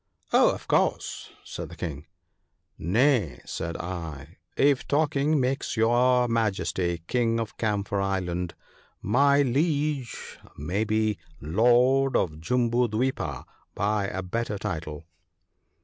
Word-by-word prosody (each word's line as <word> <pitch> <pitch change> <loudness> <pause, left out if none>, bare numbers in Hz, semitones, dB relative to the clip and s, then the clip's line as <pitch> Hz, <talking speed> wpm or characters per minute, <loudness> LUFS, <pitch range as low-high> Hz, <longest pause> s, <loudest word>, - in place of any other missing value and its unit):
' - - -27
Oh! - - +6
of - - -5
course/ - - 0
said - - -7
the - - -10
King. 75 -3 -6 0.4
' - - -50 0.2
Nay/ 120 - +3
said 85 +1 -4
I, 80 -3 -7
' - - -45
if 135 - -3
talking 150 0 +2
makes 130 -1 -1
your 125 +2 +3
Majesty 95 -6 -1
King 115 +1 +1
of 115 -2 -4
Camphor 100 -2 -1
island, 90 -3 -2 0.5
my 140 +7 +4
Liege 145 -1 -1 0.2
may 90 +9 -1
be 110 0 0 0.2
lord 125 - +3
of 75 -3 -1
Jambu 120 +4 +1
dwipa 110 - -2 0.3
by 105 0 0
a 95 0 -4
better 105 +3 -2
title.' 80 -4 -5
110 Hz, 125 wpm, -26 LUFS, 90-125 Hz, 0.5 s, Oh